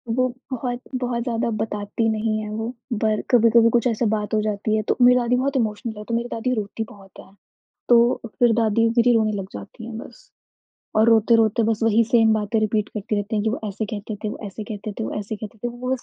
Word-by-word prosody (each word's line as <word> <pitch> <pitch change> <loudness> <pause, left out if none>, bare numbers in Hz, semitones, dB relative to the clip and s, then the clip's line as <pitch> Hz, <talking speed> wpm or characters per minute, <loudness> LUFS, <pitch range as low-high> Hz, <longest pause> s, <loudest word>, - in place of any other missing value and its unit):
वो 255 0 +2 0.2
बहुत 245 -1 -3 0.2
बहुत 245 -2 -2
ज़्यादा 235 -1 -1
बताती 210 +1 -2
नहीं 220 0 0
है, 215 - -6
वो 225 +3 -4 0.3
बर 215 -1 +2
कभी-कभी 230 -1 +5
कुछ 240 +2 +2
ऐसा 235 0 0
बात 210 0 -2
हो 215 - +3
जाती 215 0 -1
है 215 - +1
तो - - +1
मेरी 250 0 +7
दादी 240 0 +1
बहुत 270 +3 0
इमोशनल 220 -1 -2
है, 210 - -7
तो 230 - -5
मेरी 235 +1 0
दादी 255 +3 -1
रोती 215 +1 -3
बहुत 195 -2 -15
है, 190 - -14 0.6
तो 240 0 +5 0.2
फिर 240 -1 +5
दादी 225 +1 +2
मेरी 235 +1 +3
रोने 215 -1 +2
लग 190 - -5
जाती 100 - -9
हैं 235 -1 -7
बस - - -13 0.7
और 220 +1 +5
रोते-रोते 225 0 +4
बस 225 - -1
वही 225 0 +4
सेम 225 -1 +4
बातें 215 +1 0
रिपीट 215 -1 0
करती 210 0 -3
रहती 205 +2 -2
हैं 210 - +1
कि, 220 - +2
"वो 235 - -3
ऐसे 200 +2 -3
कहते 210 0 -6
थे - - 0
वो - - -6
ऐसे 200 +2 -7
कहते 210 0 -6
थे 225 - -2
वो - - -4
ऐसे 210 +1 -5
कहते 215 +1 -9
थे" 240 - -1
वो 245 +1 -5
बस 260 - -3
225 Hz, 230 wpm, -22 LUFS, 215-235 Hz, 0.7 s, मेरी